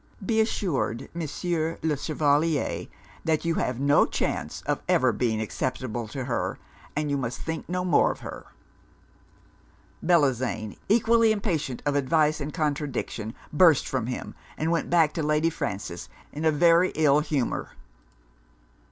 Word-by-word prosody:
Be 220 +2 +3
assured, 170 - -1
Monsieur 165 0 -2
le 160 -2 +1
Chevalier, 150 +1 0 0.4
that 160 0 0
you 165 - +2
have 125 -5 -1
no 145 +1 +4
chance - - -3
of - - -1
ever - - +4
being 115 -3 0
acceptable 120 +1 -3
to 130 +4 -5
her, 120 -2 -2 0.4
and 150 0 -1
you 140 - +1
must 125 -3 -3
think 160 0 -5
no 180 0 -1
more 180 - +4
of - - -9
her.' - - -8 1.6
Bellozane, 130 - +1
equally 230 +1 +4
impatient 165 - -2
of 145 - +1
advice 150 +2 +2
and 145 +2 -3
contradiction, 145 -8 -3 0.2
burst 160 -2 +5
from 130 -4 -2
him; 125 - -5 0.2
and 160 +2 0
went 170 - 0
back 165 -3 +4
to 165 - -2
Lady 150 +2 +2
Frances 95 - -5 0.2
in 150 +2 -4
a 160 - +5
very 170 +3 +4
ill 150 -2 +4
humour. 150 -4 -2
150 Hz, 145 wpm, -26 LUFS, 130-165 Hz, 1.6 s, burst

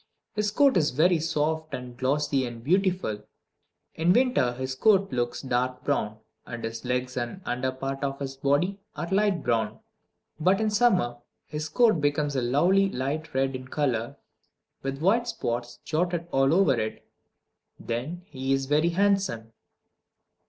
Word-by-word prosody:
His 210 -1 0
coat 275 +1 +4
is 150 -3 +3
very 165 +6 +3
soft 155 -1 -1
and 125 -1 -8
glossy 135 +2 +1
and 115 -1 -9
beautiful. 180 - +1 0.7
In 165 +3 +3
winter 245 - +3
his 130 +1 -4
coat 195 +5 +3
looks 120 +1 -2
dark 125 0 -1
brown, 110 -7 -1 0.3
and 120 -1 -7
his 115 0 -5
legs 125 0 -2
and 120 +8 -3
the - - -19
under 125 +1 -1
part 135 +1 -4
of 135 0 -2
his 135 -1 -5
body 145 +9 +1 0.2
are 170 - -4
light 195 -4 +2
brown. 110 -2 0 0.6
But 185 +5 +3
in 220 -1 +1
summer 195 - +2 0.3
his 150 0 -5
coat 215 -2 +3
becomes 145 0 0
a 130 - +1
lovely 175 +11 +3
light 145 +2 -3
red 135 0 +1
in 130 0 -7
color, 125 -5 -1 0.6
with 135 +2 -4
white 230 +6 +3
spots 120 - -3
jotted 170 +1 -1
all 135 +1 +3
over 185 -3 +4
it. 110 0 -4 0.7
Then 135 +10 -4
he 135 -7 -2
is 135 0 0
very 150 +4 +2
handsome. 185 - 0
145 Hz, 155 wpm, -27 LUFS, 125-180 Hz, 0.7 s, coat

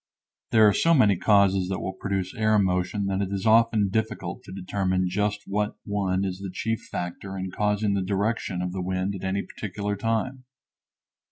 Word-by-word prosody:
There 110 -1 +6
are 105 - +5
so 165 - +4
many 105 -8 +5
causes 95 -1 +3
that 95 - -2
will 95 - -4
produce 95 -1 -3
air 110 0 +2
motion 95 +1 +1
that 100 0 0
it 100 -1 -2
is 100 0 -3
often 110 -2 +4
difficult 105 -4 -2
to - - -10
determine 95 -1 -1
just 105 +2 -1
what 105 +1 -1
one 100 -2 0
is 95 -1 -3
the 100 -1 -5
chief 110 +4 -2
factor 95 +2 -5
in 95 0 -4
causing 105 +1 0
the 100 - 0
direction 100 -1 -1
of 90 - -2
the 95 0 -4
wind 95 +2 -1
at 95 - -7
any 95 +1 -1
particular 105 0 -4
time. 115 +5 -2
100 Hz, 185 wpm, -26 LUFS, 95-105 Hz, -, There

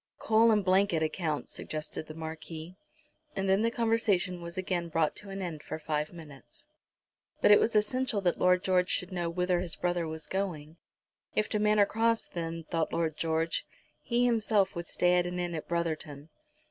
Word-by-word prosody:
"Coal 225 +1 +4
and 210 -3 +3
blanket 185 -3 +3
accounts!" 155 -1 -2
suggested 155 0 -5
the 155 - -9
Marquis. 160 +1 -7 0.6
And 195 0 -1
then 190 +2 +3
the 230 - +3
conversation 225 -6 +1
was 170 +2 -8
again 180 -2 -2
brought 160 -1 +1
to 205 - -8
an 195 0 -4
end 160 -4 -5
for 155 - -5
five 150 -1 -2
minutes. 155 -6 -13 0.7
But - - +5
it 205 - +9
was 225 - +1
essential 220 +2 +1
that 180 -2 +1
Lord 180 0 +4
George 185 -1 +2
should 180 +1 -1
know 175 -2 -1
whither 180 +1 +1
his 175 -3 -3
brother 175 -2 -1
was 160 -1 -5
going. 165 -4 -4 0.6
If 215 - +1
to 210 - 0
Manor 210 -1 +4
Cross, 225 +2 +1
then, 165 -1 -4
thought 160 0 -1
Lord 160 -2 0
George, 165 +1 0 0.4
he 240 0 +1
himself 215 -5 +2
would 170 0 -5
stay 180 0 +3
at 175 - 0
an 180 0 -4
inn 175 -1 -2
at 160 - -5
Brotherton. 155 -3 -3
175 Hz, 185 wpm, -30 LUFS, 160-200 Hz, 0.7 s, it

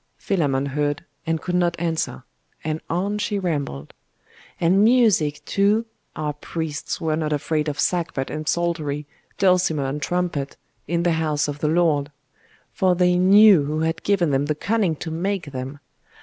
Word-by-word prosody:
Philammon 140 -8 0
heard, 145 +3 -2 0.2
and 165 0 0
could 180 - -3
not 175 -1 +2
answer; 165 - -2 0.4
and 155 0 -2
on 200 +5 -1
she 205 0 -1
rambled. 145 - -3 0.7
'And 185 +4 +4
music, 215 -11 +3
too? 205 +3 +2 0.3
Our 150 -1 -2
priests 155 0 -4
were 160 -3 0
not 155 -1 -2
afraid 150 +1 -1
of 145 -1 -3
sackbut 165 -7 -1
and 155 0 -3
psaltery, 155 -4 -1 0.3
dulcimer 180 -6 +2
and 140 +2 -3
trumpet, 170 -6 -2 0.3
in 170 +2 0
the 175 - +2
house 150 -2 0
of 145 0 -5
the 150 - 0
Lord; 155 -3 +2 0.6
for 185 -1 +2
they 180 0 +3
knew 195 -3 +7
who 155 +2 -2
had 165 +1 -1
given 180 -6 +1
them 140 +1 +1
the 150 - 0
cunning 195 0 0
to 160 - -6
make 175 -1 -2
them. 130 +2 -6
160 Hz, 160 wpm, -23 LUFS, 145-180 Hz, 0.7 s, knew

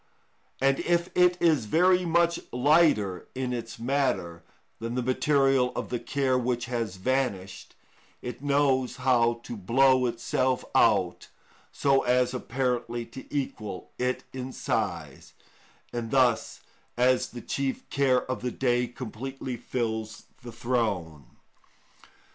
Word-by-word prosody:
And 135 0 +2
if 170 0 +1
it 180 0 +4
is 155 -9 +3
very 180 - +3
much 170 0 +2
lighter 125 - +3
in 130 -1 -2
its 115 -1 -5
matter 115 -9 -1 0.4
than 115 +1 -4
the 125 - -1
material 130 0 +2
of - - -4
the 120 - -2
care 130 -1 0
which 120 -1 -1
has 115 -5 -3
vanished, 100 -3 -2 0.4
it 125 +1 -7
knows 140 -3 +2
how 120 -2 +2
to 120 - -6
blow 130 +5 +3
itself 125 +2 -1
out - - +2 0.4
so 135 -1 +2
as 125 0 +2
apparently 125 -2 -2
to 125 +3 -11
equal 110 -9 -4
it 125 +1 -1
in 130 0 -5
size, - - -3 0.6
and 120 -2 -3
thus, 125 -3 +2 0.4
as 125 +1 +3
the 120 - -8
chief 135 +2 -3
care 130 -3 +2
of 130 - -4
the 125 - -1
day, 125 -1 0
completely 130 +2 -6
fills 110 -2 -3 0.2
the 120 - -9
throne. 100 - -2
125 Hz, 125 wpm, -27 LUFS, 115-135 Hz, 0.6 s, it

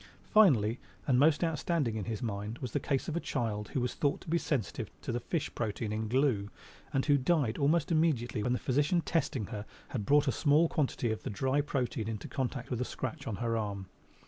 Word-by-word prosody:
Finally, 130 - +5 0.3
and 125 -2 +3
most 150 +3 +4
outstanding 160 -6 0
in 105 -3 -3
his 115 -1 -4
mind, 105 0 -3
was 125 -3 -5
the - - 0
case 135 -2 -1
of 160 - -2
a - - +1
child 110 -9 -2
who - - -1
was 125 0 -1
thought 145 -1 0
to - - -16
be 170 - +4
sensitive 130 - -2
to - - -4
the 120 - -1
fish 155 +6 -3
protein 110 -1 -2
in 110 0 -2
glue 120 -5 +1 0.4
and 135 - +1
who 145 -2 +4
died 135 -4 +1
almost 150 +3 +2
immediately 145 -9 +1
when 125 +3 +1
the - - +1
physician 145 +8 +1
testing 160 -11 0
her 105 +1 -5 0.3
had 115 -6 -3
brought 145 +6 +4
a - - +4
small 150 +5 +4
quantity 135 -7 0
of 110 - -3
the - - -4
dry 130 +7 +1
protein 125 -6 -2
into 110 -2 -4
contact 130 -1 -3
with 125 -1 -1
a - - +3
scratch 125 -1 -5
on 110 - -2
her 115 +1 -1
arm. 100 -3 -3
125 Hz, 220 wpm, -31 LUFS, 110-145 Hz, 0.4 s, Finally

